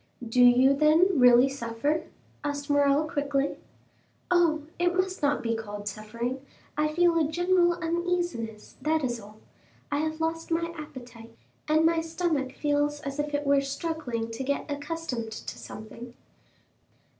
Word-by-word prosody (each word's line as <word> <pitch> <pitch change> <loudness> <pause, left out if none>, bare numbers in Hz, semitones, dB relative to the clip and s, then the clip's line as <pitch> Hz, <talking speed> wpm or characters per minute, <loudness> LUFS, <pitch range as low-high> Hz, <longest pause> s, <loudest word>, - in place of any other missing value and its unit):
"Do 245 +2 +4
you 250 +2 +6
then 315 +4 +4
really 245 +1 +7
suffer?" 275 +4 -2 0.4
asked 285 0 -3
Morrel 285 +1 +3
quickly. 285 -3 -1 0.7
"Oh, 335 -4 +3 0.2
it 350 0 +2
must 370 0 -1
not 290 0 +1
be 230 -1 0
called 205 -2 -6
suffering; 235 +5 -4 0.3
I 300 +1 +2
feel 340 +1 +3
a 310 -1 +1
general 350 0 +3
uneasiness, 340 -10 -3
that 310 +2 +1
is 240 -2 -1
all. 210 0 -13 0.5
I 285 - +1
have 315 +1 -2
lost 325 0 -2
my 335 0 -1
appetite, 240 -7 -10 0.3
and 310 +1 +3
my 330 0 +3
stomach 320 -5 -1
feels 290 0 0
as 275 0 -5
if 295 0 -1
it 290 0 -2
were 280 0 +4
struggling 275 -5 -3
to 230 +4 -4
get 280 +1 -1
accustomed 285 -6 -4
to - - -7
something." 235 +3 -10
290 Hz, 145 wpm, -27 LUFS, 245-325 Hz, 0.7 s, really